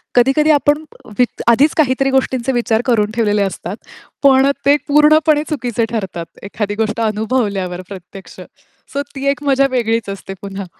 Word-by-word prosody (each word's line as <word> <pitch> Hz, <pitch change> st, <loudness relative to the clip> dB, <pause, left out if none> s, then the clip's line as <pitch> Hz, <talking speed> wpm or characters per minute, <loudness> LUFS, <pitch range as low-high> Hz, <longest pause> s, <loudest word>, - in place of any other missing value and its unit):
कधी-कधी 270 Hz, +5 st, +4 dB
आपण 295 Hz, +1 st, +2 dB, 0.4 s
वि 250 Hz, -, +6 dB, 0.2 s
आधीच 270 Hz, +6 st, +4 dB
काहीतरी 270 Hz, -2 st, +2 dB
गोष्टींचे 265 Hz, -1 st, 0 dB
विचार 235 Hz, -2 st, 0 dB
करून 215 Hz, -4 st, +1 dB
ठेवलेले 210 Hz, -3 st, +1 dB
असतात. 195 Hz, +1 st, -4 dB, 0.5 s
पण 270 Hz, 0 st, +5 dB, 0.2 s
ते 285 Hz, +1 st, +5 dB
पूर्णपणे 300 Hz, +1 st, +4 dB
चुकीचे 245 Hz, -6 st, -1 dB
ठरतात. 185 Hz, -6 st, -4 dB, 0.2 s
एखादी 205 Hz, 0 st, -4 dB
गोष्ट 220 Hz, +1 st, -2 dB
अनुभवल्यावर 210 Hz, -5 st, -1 dB
प्रत्यक्ष. 190 Hz, 0 st, -11 dB, 0.5 s
सो 280 Hz, -, -1 dB
ती 270 Hz, +1 st, -5 dB
एक 285 Hz, +1 st, -6 dB
मजा 275 Hz, -1 st, +3 dB
वेगळीच 230 Hz, -4 st, -1 dB
असते 195 Hz, 0 st, -7 dB
पुन्हा. 195 Hz, -1 st, -6 dB
235 Hz, 145 wpm, -17 LUFS, 205-275 Hz, 0.5 s, वि